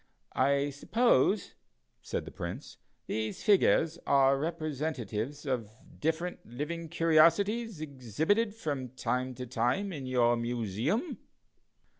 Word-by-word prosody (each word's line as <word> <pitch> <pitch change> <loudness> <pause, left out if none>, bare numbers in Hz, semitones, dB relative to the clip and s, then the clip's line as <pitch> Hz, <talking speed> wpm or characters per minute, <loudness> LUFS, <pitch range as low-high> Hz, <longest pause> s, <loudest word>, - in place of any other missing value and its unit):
"I 140 +2 +2
suppose," 205 - +2 0.5
said - - -4
the - - -8
Prince, - - -7 0.3
"these 110 0 -3
figures 170 -5 +4
are 135 -1 +5
representatives 150 - -3
of 125 -6 -2 0.3
different 165 +3 -2
living 160 +7 -5
curiosities 170 +6 +3
exhibited 155 - 0
from 145 - -3
time 130 0 -1
to 125 +1 -6
time 125 - 0
in 135 -4 -6
your 120 -2 +3
Museum?" 120 - -2
145 Hz, 105 wpm, -30 LUFS, 125-170 Hz, 0.5 s, are